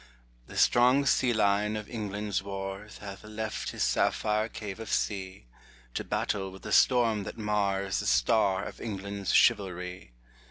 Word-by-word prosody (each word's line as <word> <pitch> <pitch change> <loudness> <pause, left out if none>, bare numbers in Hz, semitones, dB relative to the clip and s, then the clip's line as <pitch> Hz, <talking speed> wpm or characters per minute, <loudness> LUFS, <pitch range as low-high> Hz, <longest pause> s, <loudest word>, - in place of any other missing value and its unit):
The - - -9
strong 125 +4 +5
sea 130 -2 +3
lion 105 -1 +2
of 105 - -6
England's 105 -3 -3
wars 95 +1 -6
Hath 100 -1 -9
left 110 0 -4
his - - -2
sapphire 110 +1 +1
cave 105 -2 -7
of 115 - -6
sea, 95 - -2 0.5
To - - -2
battle 95 -2 -2
with 95 - -13
the - - -6
storm 115 -4 +4
that 100 - -7
mars 100 -2 0
The 100 - -3
star 100 -4 +3
of - - -9
England's 100 -3 -4
chivalry. 90 -6 +1
105 Hz, 150 wpm, -29 LUFS, 95-110 Hz, 0.5 s, strong